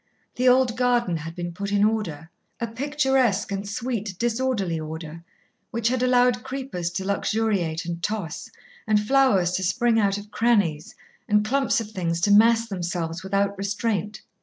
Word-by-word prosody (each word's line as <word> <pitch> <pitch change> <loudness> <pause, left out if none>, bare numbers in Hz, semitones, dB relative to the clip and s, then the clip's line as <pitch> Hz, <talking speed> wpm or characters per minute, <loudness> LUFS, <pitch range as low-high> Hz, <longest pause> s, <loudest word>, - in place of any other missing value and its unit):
The 250 +1 +3
old 250 -2 +3
garden 245 -8 +1
had 165 +1 -7
been 175 -1 -5
put 200 +3 -4
in 205 0 +3
order 175 -8 -1 0.3
a 235 - -1
picturesque 260 -4 0
and 200 0 -3
sweet 215 -4 -3
disorderly 230 -7 -1
order, 160 +1 -7 0.5
which 230 0 0
had 255 0 0
allowed 250 -1 +3
creepers 260 -10 -4
to 190 - -3
luxuriate 200 -5 0
and 170 0 -5
toss, 190 -6 -4 0.4
and 215 -1 +4
flowers 210 -6 +3
to 190 +1 -1
spring 230 +5 +2
out 200 -2 +2
of 205 +1 -10
crannies, 200 -11 +1 0.3
and 210 0 +3
clumps 265 +1 +1
of 220 -2 -6
things 170 -4 -2
to 205 - +2
mass 230 +2 +5
themselves 175 -3 -3
without 200 +1 0
restraint. 205 0 -2
210 Hz, 160 wpm, -24 LUFS, 180-240 Hz, 0.5 s, mass